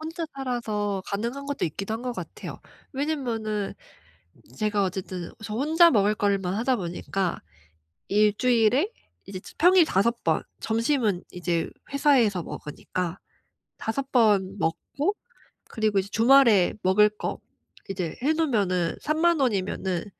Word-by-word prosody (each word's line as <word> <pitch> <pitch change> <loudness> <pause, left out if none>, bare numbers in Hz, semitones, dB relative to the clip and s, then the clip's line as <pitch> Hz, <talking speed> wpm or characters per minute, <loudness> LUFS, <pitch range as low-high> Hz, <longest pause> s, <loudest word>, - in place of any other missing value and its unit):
혼자 325 +1 -5
살아서 225 -8 -3
가능한 235 +7 -3
것도 285 -8 -2
있기도 195 +7 -3
한 225 - -6
것 250 -1 -2
같아요. - - -8 0.3
왜냐면은 235 -8 -2 0.8
제가 210 -2 +1
어쨌든 185 -2 -4
저 210 - -5
혼자 320 +7 +5
먹을 210 -2 +3
것만 195 -3 0
하다 245 +4 +1
보니까 180 0 -3 0.7
1 210 0 +3
주일에 250 - +3 0.3
이제 195 -1 -7
제 - - -13
평일 360 +1 +6
5 235 +1 +1
번, 160 -1 +2 0.2
점심은 225 -4 0
이제 175 -2 -1 0.2
회사에서 245 - +3
먹으니까 170 +5 -5 0.6
5 270 +5 -3
번 205 -6 +3
먹고 280 - -1 0.5
그리고 215 -2 0
이제 195 +1 -1
주말에 230 -4 +5
먹을 200 +3 +5
거 210 - -5 0.5
이제 180 -4 -4
해 295 +4 +3
놓으면은 200 - +1
30,000 320 +1 +2
원이면은 190 -6 -1
215 Hz, 255 characters per minute, -26 LUFS, 190-270 Hz, 0.8 s, 평일